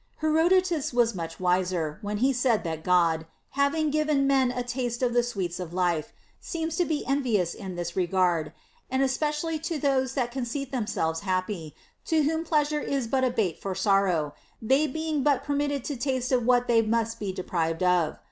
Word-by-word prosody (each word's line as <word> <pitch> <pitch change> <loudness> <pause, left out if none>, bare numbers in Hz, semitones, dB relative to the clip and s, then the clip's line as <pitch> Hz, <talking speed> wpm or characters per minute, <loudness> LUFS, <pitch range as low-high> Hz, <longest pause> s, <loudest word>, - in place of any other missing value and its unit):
Hero 315 +2 +3
dotus 365 -5 +2
was 235 -1 +3
much 165 -3 -6
wiser, 180 -4 0
when 205 0 -3
he 270 - +3
said 245 -3 +1
that 160 -1 -4
God, 165 -3 +2 0.2
having 285 +2 +1
given 300 -2 +2
men 270 -2 +3
a 250 0 -3
taste 245 0 -3
of 245 -1 +1
the 240 - +4
sweets 195 -8 -3
of 175 -1 -6
life, 175 -4 0 0.3
seems 325 -1 -3
to 355 - +2
be 310 -3 -2
en 275 +1 +1
vious 200 -9 +1
in 190 -2 -7
this 175 -1 -4
regard,* 175 -3 +1 0.4
and 260 +1 +1
especially 300 +4 -1
to 320 +1 -3
those 265 -2 +1
that 245 -3 0
conceit 260 +2 -4
themselves 185 -10 -1
happy, 185 -3 -3 0.3
to 315 -2 +2
whom 320 +2 0
pleasure 300 -2 +1
is 275 -3 -1
but 260 +3 0
a 255 - +3
bait 220 -9 -1
for 195 -1 -3
sor 195 0 +3
row, 155 -6 0 0.3
they 270 +7 +2
being 315 +1 -2
but 285 0 +2
permitted 285 -2 -1
to 290 - -3
taste 255 0 -1
of 245 -2 +2
what 245 -1 +4
they 230 -2 +4
must 230 +1 -1
be 200 -2 -2
deprived 170 -2 -2
of. 180 -3 +2
240 Hz, 195 wpm, -27 LUFS, 185-280 Hz, 0.4 s, the